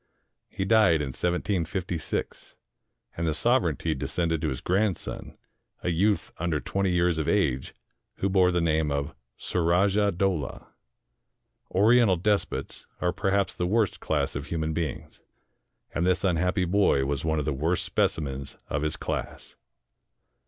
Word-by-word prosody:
He 95 - -3
died 100 -6 +5
in 75 -2 -2
1756, 90 +1 -2 0.6
and 85 0 -2
the 80 - 0
sovereignty 85 - +1
de 65 - -4
scended 80 -2 -1
to 80 - 0
his 65 - -3
grandson, 95 0 -2 0.5
a 90 - 0
youth 100 +5 +1
under 85 -2 0
twenty 100 +5 -1
years 90 -2 +2
of 80 - -2
age, 70 -11 0 0.4
who 100 - -1
bore 95 -2 +4
the 90 -1 +1
name 80 -2 +1
of 70 +1 -2 0.2
Surajah 95 +4 +2
Dowlah. 90 -4 -1 1.0
Oriental 110 0 +4
despots 105 +3 -1
are 90 -1 0
perhaps 100 0 0
the 90 - -2
worst 110 +1 +1
class - - -1
of 70 +1 -4
human 80 -1 -2
beings; 80 -5 -4 0.7
and 85 - 0
this 90 +1 +2
unhappy 90 +1 +1
boy 90 -7 +3
was 70 +1 -2
one 80 0 0
of 75 - -1
the 75 - 0
worst 80 +6 0
specimens 70 -3 -1
of 70 - 0
his 75 0 -2
class. - - -5
85 Hz, 145 wpm, -27 LUFS, 80-95 Hz, 1.0 s, died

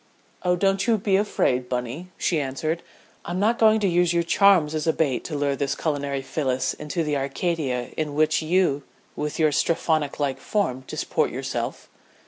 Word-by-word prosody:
"Oh, 180 -1 +2
don't 195 +3 +1
you 230 -2 +4
be 195 -1 +1
afraid, 130 -11 +1
Bunny," 125 +8 -3
she 165 - +1
answered. 155 +5 -2 0.4
"I'm 175 +1 -3
not 225 +4 +2
going 220 -1 +5
to 200 - +2
use 175 -1 +2
your 170 0 +2
charms 175 -3 +4
as 155 0 -2
a 160 - +4
bait 140 -6 0
to 155 - -4
lure 140 -1 0
this 140 0 -1
culinary 140 -3 -2
Phyllis 130 -2 -1
into 165 +3 -3
the 150 -1 -1
Arcadia 140 -3 -2
in 150 -2 -3
which 155 +1 +3
you 160 -3 +2 0.3
with 150 0 -3
your 155 -2 +3
Strephonlike 145 -3 0
form 130 -12 -1
disport - - -1
yourself." - - -4
155 Hz, 170 wpm, -24 LUFS, 140-180 Hz, 0.4 s, going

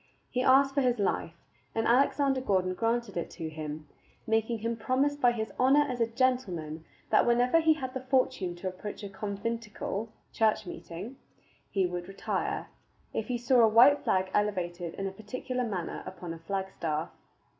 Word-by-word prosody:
He 250 - 0
asked 270 +1 +5
for 280 - +2
his 250 -2 +2
life, 190 -4 -1 0.4
and 225 0 +1
Alexander 270 +2 +3
Gordon 185 -6 +1
granted 230 +1 -1
it 170 - -2
to 165 -3 -4
him, 155 -1 -6 0.4
making 225 +1 +1
him 230 +2 -2
promise 260 +6 +1
by 250 -4 +4
his 220 -2 -4
honor 275 +3 +5
as 250 -3 -3
a 230 - +3
gentleman 200 - -1 0.3
that - - +6
whenever 245 +6 +4
he 320 -1 +4
had 260 -4 -5
the 260 - -3
fortune 255 -8 +1
to 175 +2 -5
approach 195 +3 -6
a 200 - -5
conventicle 210 +1 -4 0.2
(church 220 -2 +2
meeting) 185 +8 -8 0.5
he 195 -2 +1
would 175 0 -4
retire, 195 - -3 0.4
if 220 - -2
he 250 - -1
saw 245 +1 +3
a 225 - +7
white 245 +7 +7
flag 185 0 +1
elevated 175 -5 -1
in 195 - -4
a 195 - -2
particular 250 +5 -4
manner 190 -7 -3
upon 170 -2 -6
a 165 - -9
flagstaff. 170 -3 -3
220 Hz, 170 wpm, -29 LUFS, 185-255 Hz, 0.5 s, a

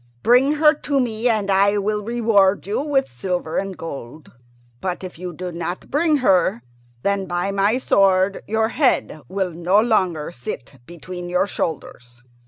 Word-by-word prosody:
Bring 250 +5 +4
her 305 0 +5
to 285 -2 0
me, 235 -1 0
and 210 -3 0
I 200 +2 +3
will 210 +1 -1
reward 215 -4 +2
you 205 +6 -1
with 280 -2 +1
silver 170 +5 -3
and 195 -1 -5
gold. 140 -2 -8 0.5
But 185 0 -4
if 180 -3 -8
you 180 0 -5
do 180 +2 -6
not 170 +1 -5
bring 305 +1 +2
her, 180 -11 +3 0.4
then, 200 -1 0
by 175 +3 -1
my 200 +4 +2
sword, 195 -5 +2
your 220 +1 +1
head 250 - +1
will 190 -1 -2
no 175 +4 +2
longer 185 -9 +1
sit 130 -1 -8
between 175 +1 -8
your 180 +2 +2
shoulders!" 125 -9 -5
195 Hz, 160 wpm, -21 LUFS, 175-220 Hz, 0.5 s, her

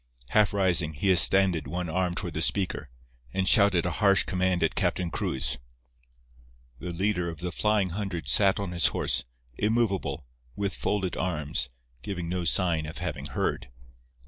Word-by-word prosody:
Half 105 -2 +3
rising, 90 -5 +2
he 95 +7 +1
extended 90 -3 +4
one 90 +4 -4
arm 90 +2 -1
toward 90 -4 -4
the 80 - -3
speaker, 95 +2 0 0.5
and 95 -1 0
shouted 100 -5 +4
a 90 - -1
harsh 100 -2 +5
command 90 -1 0
at 80 - +1
Captain 90 -2 0
Cruz. 65 -3 -2 1.2
The 90 +4 -6
leader 90 0 -1
of 80 - -8
the 90 0 -4
"Flying 105 -1 +1
Hundred" 90 -5 -5
sat 100 +3 +4
his 90 -5 +1
horse, - - +1 0.3
immovable, 100 - -1 0.3
with 100 -1 -2
folded 95 -3 -2
arms, 75 -8 -1 0.3
giving 90 +3 -5
no 90 0 -3
sign 85 -3 +1
of 80 - -8
having - - -4
heard. - - -3
90 Hz, 150 wpm, -27 LUFS, 85-100 Hz, 1.2 s, harsh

